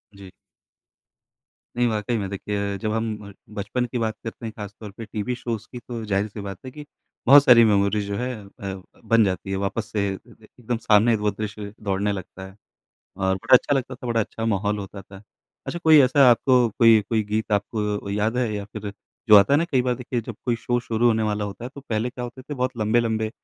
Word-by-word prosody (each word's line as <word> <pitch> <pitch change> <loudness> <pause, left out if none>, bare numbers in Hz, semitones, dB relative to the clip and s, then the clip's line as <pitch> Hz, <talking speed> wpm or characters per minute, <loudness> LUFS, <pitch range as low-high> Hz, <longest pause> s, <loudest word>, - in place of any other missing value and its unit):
जी। 95 -2 -12 1.5
नहीं, 120 0 +3
वाकई 110 +1 -1
में 100 -2 -3
देखिए 100 0 -3
जब 105 +1 -2
हम 110 -2 -3
अ, - - -13 0.2
बचपन 110 +4 -2
की 120 +1 -4
बात 110 -1 -1
करते 115 +1 -7
हैं 110 - -4
खासतौर 105 0 -8
पे 115 - -6
टीवी 110 +3 -3
शोज़ 115 -3 -5
की 125 - -7
तो 115 -1 -7
ज़ाहिर 100 0 0
सी 105 0 -8
बात 100 -2 -6
है 130 - -7
कि 150 +1 -10 0.4
बहुत 140 +2 +9
सारी 120 -3 +7
मेमोरी 100 0 +2
जो 100 0 -3
है 125 +2 -2
अ, 100 -1 -8 0.2
बन 115 -1 +4
जाती 95 0 -3
है 95 - 0
वापस 105 +3 -2
से 100 -2 0
अ, - - -10 0.4
एकदम 120 0 -2
सामने 110 +1 +4
वो 105 - +3
दृश्य 105 0 -6
दौड़ने 100 +1 0
लगता 95 -1 -7
है, 95 - -15 0.6
और 95 0 +1
बड़ा 95 - +3
अच्छा 145 - 0
लगता 130 -1 -2
था, 125 0 -9
बड़ा 115 -1 +1
अच्छा 115 +1 -4
माहौल 105 0 0
होता 100 0 -8
था। 95 +1 -14 0.4
अच्छा 175 - -4
कोई 155 -2 +8
ऐसा 130 0 +5
आपको 125 0 +4
कोई 115 -2 +7
कोई 110 -2 +1
गीत 110 +1 -2
आपको 105 +1 -1 0.2
अ, - - -4
याद 105 +4 0
है 120 -4 0
या 100 - -4
फिर 105 0 -7 0.4
जो 105 - +10
आता 100 +5 +5
है - - +5
ना? 165 - +1
कई 135 -7 +1
बार 125 -1 0
देखिए 125 -1 -3
जब - - -8
कोई 120 -2 +1
शो 120 +1 -1
शुरू 120 0 0
होने 110 -1 +3
वाला 105 -1 -1
होता 100 +4 -7
है, 125 - -4
तो 140 - -9
पहले 120 -2 -2
क्या 125 0 -6
होते 125 +2 -9
थे 145 +2 -7
बहुत 125 -1 -2
लंबे-लंबे 110 0 +1
110 Hz, 225 wpm, -23 LUFS, 100-120 Hz, 1.5 s, जो